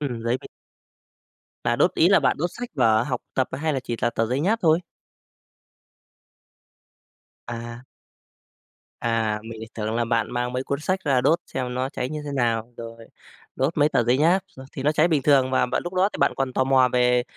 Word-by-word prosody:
Ừm, 125 -6 -4
giấy 120 +2 0
bịch. - - -12 1.2
Là - - +1
đốt - - +2
ý - - +4
là - - +5
bạn - - +2
đốt 175 +3 -1
sách 245 0 -6
vở 115 -4 +3
học 125 -1 -3
tập 130 - +1
hay 155 +4 -1
là 135 - -1
chỉ 120 -2 -4
là 120 - +1
tờ 115 -1 -1
giấy 130 +4 -1
nháp 210 +8 +1
thôi? 160 0 +4 2.7
À. 120 0 -7 1.2
À, 110 -2 0
mình 115 0 -8
lại 110 - -8
tưởng 110 0 -3
là 120 0 +1
bạn 115 -2 0
mang 125 0 -2
mấy 130 +1 -2
cuốn 140 +1 -3
sách 185 +5 -1
ra 135 -3 +3
đốt 160 +7 +3
xem 125 -1 -4
nó 130 +1 -1
cháy 125 -3 -4
như 150 +1 -5
thế 145 - -5
nào. 115 -3 -1
Rồi, 115 -1 -9 0.5
đốt 140 +6 0
mấy 145 +1 +4
tờ 120 - +2
giấy 125 +3 +2
nháp, 175 +5 +3
ờ, 130 - -10
thì 135 - -6
nó 150 +2 +2
cháy 155 +2 +3
bình 155 -5 +1
thường 135 -2 +4
mà, 130 - +2
bạn - - -2
lúc 175 - -5
đó 185 +2 +3
thì - - -5
bạn 140 - +3
còn 135 -1 -1
tò 130 - +1
mò 130 -1 +4
về 125 0 +3
130 Hz, 215 wpm, -24 LUFS, 120-145 Hz, 2.7 s, là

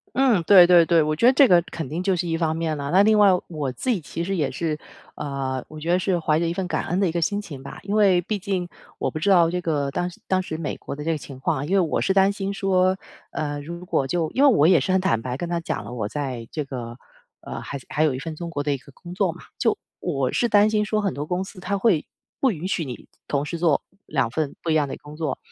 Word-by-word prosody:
嗯， 245 -9 +3
对 185 -4 +9
对 175 -1 +7
对， 165 -1 +4
我 155 0 0
觉 195 - -1
得 255 - +7
这 265 -1 +6
个 175 -2 +6
肯 165 -5 -6
定 165 +6 -3
就 190 -1 +2
是 175 0 -2
一 165 - 0
方 160 -1 0
面 160 -1 -1
了。 140 0 -4
那 190 +2 +6
另 215 0 +4
外 205 -1 +7 0.2
我 150 -6 -3
自 255 - -6
己 235 - +3
其 165 +1 -5
实 195 +3 -2
也 145 -6 0
是 155 +2 -2 0.4
呃， 135 -3 -3
我 155 0 -10
觉 165 +3 -3
得 180 - +4
是 185 -1 0
怀 155 -1 +1
着 170 - 0
一 165 - 0
份 180 0 -3
感 - - -1
恩 180 +3 0
的 190 - +3
一 - - -2
个 170 - -1
心 205 +4 0
情 140 -9 -9
吧。 - - -9
因 200 +2 -3
为 195 -4 +5
毕 205 +4 -3
竟 185 -3 -2 0.3
我 - - -1
不 155 - -5
知 200 +6 +1
道 170 -3 +5
这 180 0 -2
个 145 -4 -1
当 175 +5 -2 0.2
当 185 0 +2
时 160 -3 -5
美 160 - -3
国 - - -7
的 150 - -7
这 165 - -1
个 - - 0
情 135 -3 -10
况， 135 +1 -1
因 175 - -4
为 195 - +5
我 165 -4 0
是 190 - +2
担 195 0 +4
心 200 0 -3
说， 190 -1 +2 0.3
呃， 145 -1 -3
如 170 +3 -8
果 135 - 0
就 165 0 -1
因 270 - +1
为 280 - +8
我 155 -3 +5
也 180 -5 +5
是 185 - -1
很 190 - +3
坦 115 -11 +1
白 125 +2 -4
跟 175 - -4
他 170 0 -1
讲 165 - -3
了， 115 +4 -8
我 110 -4 -2
在 130 -4 -4
这 150 - -2
个 120 -3 -7 0.4
呃， - - -7
还 140 - -5
还 155 - 0
有 150 -4 +2
一 - - -4
份 155 +3 -6
中 170 +1 -6
国 145 -3 -2
的 145 0 0
一 - - -1
个 135 +2 -16
工 175 +5 -10
作 185 -3 +1
嘛， 175 - -12 0.2
就 225 - +1 0.2
我 135 -7 -1
是 240 - +1
担 205 +1 +5
心 210 -1 +1
说 215 0 0
很 200 -2 -1
多 145 - -4
公 180 +4 -2
司 190 0 -10
他 200 +2 -2
会 190 -8 +2 0.3
不 265 - +3
允 165 +1 -5
许 170 -5 -1
你 125 -3 -8 0.2
同 145 0 0
时 170 - -4
做 165 -4 +2 0.2
2 - - 0
份 155 -3 -2
不 170 - -5
一 - - +3
样 150 -3 +2
的 - - -5
工 150 +1 -11
作 155 -4 -2
170 Hz, 310 characters per minute, -23 LUFS, 145-190 Hz, 0.4 s, 对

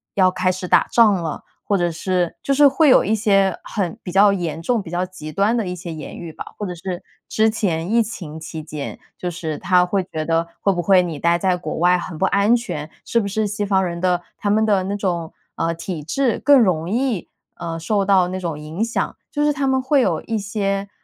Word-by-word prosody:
要 185 -2 +4
开 185 0 +1
始 185 0 -5
打 - - +4
仗 230 -3 +6
了？ 165 -5 -3 0.2
或 200 - +1
者 175 -1 +1
是 175 +1 -1
就 275 - +1
是 285 +1 +7
会 285 +2 +4
有 - - +7
一 215 +3 +1
些 195 -3 +2
很 195 -2 -3
比 180 - -5
较 200 +1 +5
严 165 -4 -3
重、 230 +4 0
比 165 - -9
较 180 +1 0
极 155 -4 -9
端 200 +8 +2
的 225 -4 0
一 180 - -3
些 170 -2 -7
言 155 -2 -8
语 165 -2 -8
吧。 - - -7
或 205 - -4
者 180 - -5
是 180 +1 -5 0.3
之 220 0 +3
前 175 -6 -1
疫 230 +1 +4
情 170 -8 -7
期 160 0 -7
间， 150 -2 -7 0.2
就 180 -1 -3
是 160 -3 -4
他 180 +1 +3
会 190 +1 0
觉 155 -3 -5
得 165 +1 +1
会 195 - +2
不 175 - -1
会 185 +1 +5
你 170 -4 -4
待 170 +3 +2
在 185 0 +2
国 160 -4 -5
外 180 +2 +4
很 175 -2 -6
不 190 - +1
安 200 +3 +3
全， 155 -11 -5 0.2
是 235 - +1
不 - - -4
是 210 +2 -1
西 210 +1 -3
方 190 -1 +2
人 170 -1 -4
的， 180 -1 +1 0.2
他 205 - -2
们 220 +1 +3
的 200 -3 +2
那 200 +2 -2
种， 175 -5 -2 0.2
呃， 165 0 0
体 165 -1 -6
制， 240 - 0
更 285 -1 +7
容 175 -6 +1
易， 235 -3 -1 0.3
呃， 165 -1 -5
受 200 +5 0
到 190 -2 +4
那 185 +1 -4
种 165 -5 -4
影 160 +8 -4
响？ 230 - -2 0.2
就 295 0 0
是 295 - +3
他 275 0 -1
们 265 -1 +2
会 270 +1 +3
有 170 -9 +1
一 225 -1 -2
些， 200 -1 -2
185 Hz, 255 characters per minute, -21 LUFS, 170-210 Hz, 0.3 s, 是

